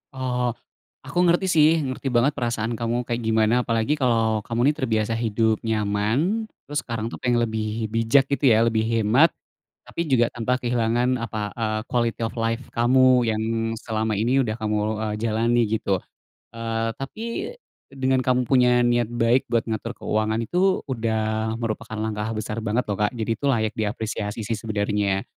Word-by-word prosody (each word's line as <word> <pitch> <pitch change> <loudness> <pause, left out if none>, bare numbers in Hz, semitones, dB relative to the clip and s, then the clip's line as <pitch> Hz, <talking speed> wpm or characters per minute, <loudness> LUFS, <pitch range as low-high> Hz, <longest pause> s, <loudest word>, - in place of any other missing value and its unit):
Oh, 125 -2 -1 0.5
aku 175 - -7
ngerti 175 +3 +3
sih, 155 -2 +6 0.2
ngerti 130 0 -4
banget 125 +5 +4
perasaan 115 -4 -2
kamu 120 +1 -1
kayak 120 0 -3
gimana, 110 0 +3
apalagi 115 +6 0
kalo 115 -3 +2
kamu 120 +5 +2
nih, - - -8
terbiasa 115 -4 0
hidup 110 -1 +1
nyaman, 110 - 0 0.2
terus 145 0 -2
sekarang 115 -2 -4
tuh - - -8
pengen 120 -1 +1
lebih 110 -1 -3
bijak, 115 +5 +3
gitu 140 0 +2
ya, 115 -2 +5
lebih 110 -1 +1
hemat, 115 +6 +4 0.6
tapi 170 -1 -4
juga 120 -4 +3
tanpa 120 +1 -1
kehilangan 120 +1 +1
apa, 105 -2 -4
eee, 110 -2 -1
quality 120 -2 0
of 115 +2 -3
life 115 +3 -1
kamu 125 0 +4
yang 110 -1 0 0.4
selama 110 -1 -2
ini 120 +6 +2
udah 110 -3 -2
kamu 110 -1 -2 0.3
e - - -1
jalani, 115 +2 +1
gitu. 100 -3 0 0.5
Eee, 115 0 -2
tapi 135 +11 -7 0.7
dengan 130 -1 0
kamu 125 -1 +1
punya 125 -2 +4
niat 120 -1 +2
baik 120 +2 +2
buat 115 -1 +1
ngatur 115 +1 -3
keuangan, 110 +1 -1
itu 185 - +1
udah 110 -3 -1
merupakan 115 -1 -4
langkah 110 0 -2
besar 110 +1 -4
banget, 115 +3 0
loh, 100 - -1
Kak, 105 - +3
jadi 110 0 -3
itu 140 - -5
layak 110 -5 +1
diapresiasi 105 0 -3
sih, 115 - -2
sebenernya. 105 -2 -1
115 Hz, 165 wpm, -23 LUFS, 110-125 Hz, 0.7 s, sih